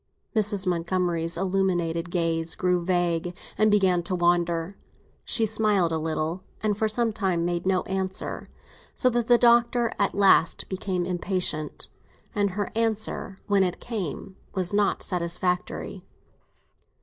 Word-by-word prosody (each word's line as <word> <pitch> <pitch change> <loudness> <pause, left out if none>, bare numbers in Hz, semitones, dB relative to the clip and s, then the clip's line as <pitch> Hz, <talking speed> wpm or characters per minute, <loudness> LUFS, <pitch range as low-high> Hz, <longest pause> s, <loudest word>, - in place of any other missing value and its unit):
Mrs. 205 -2 +1
Montgomery's 170 -1 0
illuminated 175 -3 0
gaze 165 -2 0
grew 180 -1 +1
vague, 175 -1 0 0.2
and 215 0 +3
began 190 -4 +3
to 185 +2 -2
wander. 175 +1 +1 0.5
She 225 - +1
smiled 210 -5 +2
a 160 - 0
little, 160 +2 -2 0.2
and 210 -1 +1
for 220 +2 +1
some 225 +1 +1
time 185 -5 0
made 175 +1 -2
no 185 -1 +2
answer, 190 0 -4 0.5
so 255 - +3
that 240 -1 0
the 240 - +6
Doctor 235 0 +4
at 200 - +1
last 195 -4 +4
became 185 -1 -2
impatient. 180 -4 -2 0.5
And 205 -3 +1
her 205 - -2
answer, 220 -3 -2
when 200 -2 +3
it 180 -2 0
came, 195 - -5 0.2
was 185 0 0
not 205 -1 +1
satisfactory. 180 0 -2
185 Hz, 135 wpm, -26 LUFS, 175-205 Hz, 0.5 s, the